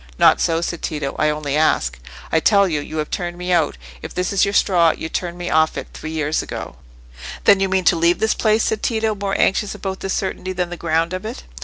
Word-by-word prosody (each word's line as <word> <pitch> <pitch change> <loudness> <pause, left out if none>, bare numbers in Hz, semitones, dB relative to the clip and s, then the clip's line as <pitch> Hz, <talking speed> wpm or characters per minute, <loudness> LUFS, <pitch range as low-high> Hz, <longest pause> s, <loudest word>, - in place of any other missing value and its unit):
"Not - - +5
so," 165 0 +1
said 170 -1 -3
Tito; 150 -3 -3
"I 155 - +3
only 150 -2 -2
ask." - - +1 0.3
"I 160 - +4
tell 200 +3 +4
you, 155 -4 -1
you 155 - -7
have 155 -1 -3
turned 175 -1 -3
me 180 0 -3
out. 160 - +1 0.2
If - - -9
it 180 +2 -1
is 195 - +3
your 200 - -2
straw, 175 -4 +4
you 160 - -5
turned 175 0 -3
me 175 0 -4
off 160 0 +2
it - - -6
three 155 - -7
years 155 -1 -1
ago." - - -7 0.7
"Then 200 - +6
you 195 0 +1
mean 190 0 +1
to - - +5
leave 170 +1 +3
this 220 0 +1
place?" 220 0 +2
said 220 - -1
Tito, 220 -2 0
more 200 -1 -2
anxious 200 +1 +1
about 190 -1 -5
this 195 - -2
certainty 185 -1 -3
than 180 -1 -2
the - - -4
ground 165 0 0
of 185 - -4
it. 215 - -6
175 Hz, 240 wpm, -20 LUFS, 160-195 Hz, 0.7 s, Then